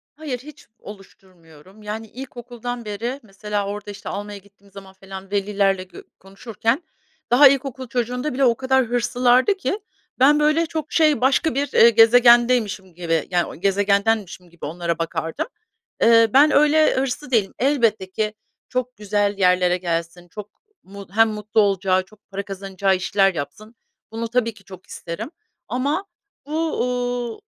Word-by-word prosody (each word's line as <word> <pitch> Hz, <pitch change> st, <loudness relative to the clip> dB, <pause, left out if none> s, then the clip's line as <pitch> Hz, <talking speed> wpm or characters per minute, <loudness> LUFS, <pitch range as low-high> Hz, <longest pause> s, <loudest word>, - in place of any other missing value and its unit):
Hayır, 290 Hz, -5 st, -5 dB
hiç 295 Hz, +3 st, -14 dB
oluşturmuyorum. 190 Hz, -2 st, -15 dB
Yani, 215 Hz, +2 st, -6 dB
ilkokuldan 245 Hz, -1 st, -8 dB
beri 230 Hz, +6 st, -4 dB
mesela 205 Hz, 0 st, -4 dB
orada, 205 Hz, 0 st, -6 dB
işte, 200 Hz, 0 st, -9 dB
almaya 205 Hz, 0 st, -6 dB
gittiğim 200 Hz, 0 st, -21 dB
zaman 195 Hz, 0 st, -12 dB
falan 190 Hz, 0 st, -11 dB
velilerle 200 Hz, -1 st, 0 dB
gö 185 Hz, -, -13 dB, 0.2 s
konuşurken, 225 Hz, -, -3 dB, 0.5 s
daha 280 Hz, +4 st, +8 dB
ilkokul 265 Hz, -1 st, -1 dB
çocuğunda 250 Hz, +4 st, -2 dB
bile 270 Hz, +1 st, +2 dB
o 235 Hz, -2 st, +3 dB
kadar 265 Hz, 0 st, +1 dB
hırslılardı 245 Hz, -, +2 dB
ki 390 Hz, +2 st, -2 dB, 0.4 s
ben, 290 Hz, +3 st, +5 dB
böyle, 305 Hz, +2 st, +2 dB
çok, 315 Hz, -1 st, -5 dB
şey, 305 Hz, -4 st, +3 dB
başka 265 Hz, +2 st, +2 dB
bir, 285 Hz, +1 st, 0 dB
eee, 235 Hz, -, +7 dB
gezegendeymişim 235 Hz, -4 st, +4 dB
gibi, 165 Hz, -3 st, -1 dB
yani, 175 Hz, -3 st, -1 dB
gezegendenmişim 200 Hz, -1 st, 0 dB
gibi 170 Hz, 0 st, -10 dB
onlara 170 Hz, +2 st, -3 dB
bakardım. 165 Hz, -, -3 dB, 0.5 s
Eee, 230 Hz, 0 st, +6 dB
ben 290 Hz, +3 st, +6 dB
öyle 300 Hz, +2 st, +4 dB
hırslı 260 Hz, +1 st, -3 dB
değilim. 215 Hz, -5 st, +1 dB
Elbette 230 Hz, -8 st, +1 dB
ki, 215 Hz, +2 st, -2 dB, 0.4 s
çok 250 Hz, 0 st, -3 dB
güzel 205 Hz, 0 st, -1 dB
yerlere 180 Hz, -1 st, +3 dB
gelsin, 170 Hz, 0 st, -4 dB
çok 210 Hz, +3 st, -9 dB, 0.3 s
mu 200 Hz, +1 st, -11 dB
hem 225 Hz, +2 st, +4 dB
mutlu 215 Hz, 0 st, 0 dB
olacağı, 190 Hz, -2 st, +1 dB
çok 210 Hz, +2 st, -24 dB
para 200 Hz, 0 st, -5 dB
kazanacağı 195 Hz, 0 st, -1 dB
işler 195 Hz, +1 st, +1 dB
yapsın. 195 Hz, +10 st, -7 dB, 0.4 s
Bunu 230 Hz, +1 st, -4 dB
tabii 235 Hz, -2 st, 0 dB
ki 205 Hz, -, -19 dB
çok 185 Hz, -1 st, -13 dB
isterim. 190 Hz, -, -7 dB, 0.4 s
Ama 285 Hz, +10 st, -1 dB, 0.4 s
bu, 315 Hz, +2 st, -2 dB
ııı, 245 Hz, -2 st, -3 dB
215 Hz, 145 wpm, -21 LUFS, 195-250 Hz, 0.5 s, daha